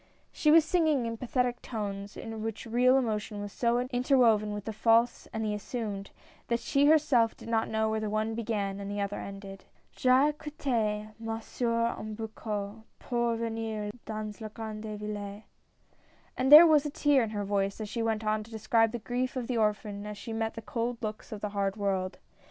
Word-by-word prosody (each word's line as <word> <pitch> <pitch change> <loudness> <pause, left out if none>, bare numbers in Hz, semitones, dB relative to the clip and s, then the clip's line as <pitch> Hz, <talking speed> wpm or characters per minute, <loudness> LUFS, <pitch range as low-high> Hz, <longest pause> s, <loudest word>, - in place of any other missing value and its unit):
She 305 - +1
was 320 0 +7
singing 315 -7 +2
in 230 0 -3
pathetic 250 0 -1
tones, 200 -3 -5
in 225 -1 -6
which 225 0 -4
real 250 +3 +4
emotion 215 -4 -2
was 205 0 -5
so 235 0 +1
interwoven 245 -5 +3
with 205 -1 -5
the 220 - -4
false 230 +2 +3
and 220 0 -2
the 210 - 0
assumed, 210 -2 -4 0.4
that 235 0 +1
she 280 +4 +2
herself 280 -7 +4
did - - -12
not 225 -1 +1
know 220 0 +1
where 220 0 0
the 215 -1 -2
one 215 +1 -1
began 205 -3 -2
or - - -5
the 205 +1 -4
other 200 0 -2
ended. 195 -1 -8
" - - -36
J'ai 260 +3 +4
quittee 235 -9 -2
ma 225 0 -3
soeur 230 0 -1
au - - -8
berceau 215 -1 -5 0.2
Pour 235 -1 0
venir 225 -2 -3 0.2
dans 215 0 -5
la 220 - -4
grande 215 -1 -6
ville." 205 0 -6 0.9
And 260 +2 0
there 310 +3 +12
was 305 -3 +5
a 295 - -2
tear 285 -1 +3
in 225 - -1
her 205 -1 -3
voice 195 0 -1
as 215 - -4
she 230 +3 -3
went 225 -1 -1
on 215 0 +1
to 215 - -12
describe 225 0 +2
the - - -1
grief 250 +3 -2
of 255 -2 -2
the 245 0 -2
orphan 210 -1 -1
as 210 -1 -6
she 225 +2 -6
met 225 0 -2
the 225 - -7
cold 235 +2 -2
looks 215 0 -5
of 210 -2 -6
the 210 - -2
hard 200 0 -1
world. 190 -2 -1
220 Hz, 200 wpm, -29 LUFS, 210-240 Hz, 0.9 s, there